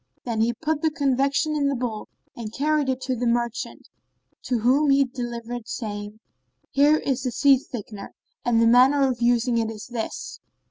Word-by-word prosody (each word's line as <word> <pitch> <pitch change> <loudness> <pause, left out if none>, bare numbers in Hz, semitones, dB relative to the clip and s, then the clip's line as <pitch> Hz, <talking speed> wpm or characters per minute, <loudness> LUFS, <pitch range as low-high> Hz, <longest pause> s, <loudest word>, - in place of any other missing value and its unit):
Then 230 -3 -1
he 230 +1 +3
put 310 +3 -2
the 320 - +2
confection 280 0 +1
in 285 -2 +1
the 280 - 0
bowl 235 -4 -4 0.3
and 220 -3 -6
carried 295 +2 0
it 260 0 -1
to 260 -1 -2
the 245 0 -1
merchant, 235 0 -2 0.5
to 250 - -1
whom 275 +6 +3
he 275 0 +5
delivered 240 -2 -5
it, 225 -2 -12
saying, 205 -1 -5 0.5
"Here 290 +2 +4
is 270 -4 -2
the 255 - -1
seed 275 +2 +4
thickener, 210 -4 -7 0.3
and 240 -2 +2
the 230 - +4
manner 260 +4 +5
of 245 -2 -3
using 235 0 +2
it 225 -1 -1
is 220 -1 -8
this. 240 -3 -5
245 Hz, 185 wpm, -24 LUFS, 230-275 Hz, 0.5 s, he